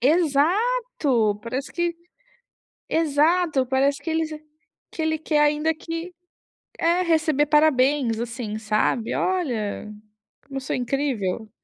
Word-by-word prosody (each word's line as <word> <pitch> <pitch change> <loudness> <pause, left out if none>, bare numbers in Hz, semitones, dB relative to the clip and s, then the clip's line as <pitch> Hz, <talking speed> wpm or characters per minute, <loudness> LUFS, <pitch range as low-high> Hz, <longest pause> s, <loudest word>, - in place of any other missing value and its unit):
Exato, 310 - +2
parece 255 +5 -4
que 345 -1 -1 0.9
exato, 315 -2 +2
parece 275 +2 +1
que 325 - -3
eles 320 0 0 0.6
que 320 - -5
ele 315 0 0
quer 305 -1 +1
ainda 300 +2 +2
que 330 +3 -6 0.7
é, 340 +2 +2
receber 315 -4 +2
parabéns, 280 -5 +3
assim, 230 -2 -4
sabe: 220 +1 0
"Olha 240 - -2 0.5
como 275 -1 -8
eu - - -3
sou 265 - -3
incrível". 245 -6 -2
295 Hz, 115 wpm, -23 LUFS, 250-325 Hz, 0.9 s, parabéns